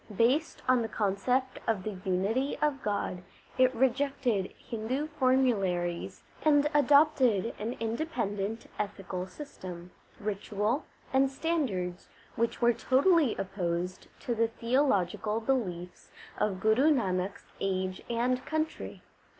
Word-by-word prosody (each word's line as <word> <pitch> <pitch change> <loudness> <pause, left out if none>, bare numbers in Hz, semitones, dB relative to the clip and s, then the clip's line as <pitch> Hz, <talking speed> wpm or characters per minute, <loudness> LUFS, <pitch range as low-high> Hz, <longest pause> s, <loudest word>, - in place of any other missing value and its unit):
Based 265 +8 +2
on 255 -1 +4
the 225 - -1
concept 225 +6 0
of 215 -5 +1
the 210 -1 -4
unity 210 +8 0
of 290 -3 0
God, 200 -3 -2 0.4
it 255 0 +6
rejected 255 -5 +1
Hindu 240 +5 -3
formularies 200 -10 +1 0.2
and 295 -1 +4
adopted 280 -7 +4
an 220 +3 -2
independent 225 -4 -2
ethical 195 -3 -3
system, 180 - -9 0.3
ritual, 210 - -1 0.3
and 265 0 +4
standards 260 - -2 0.3
which 230 +1 -1
were 240 0 +6
totally 270 - +3
opposed 180 -2 -3
to 240 - -1
the 230 0 +2
theological 225 -4 +1
beliefs 190 -8 -2 0.3
of 195 -3 0
Guru 235 +9 +4
Nanak 190 -7 0
s - - -16 0.2
age 185 -1 -1
and 250 +2 0
country. 315 +2 -3
230 Hz, 115 wpm, -30 LUFS, 195-265 Hz, 0.4 s, it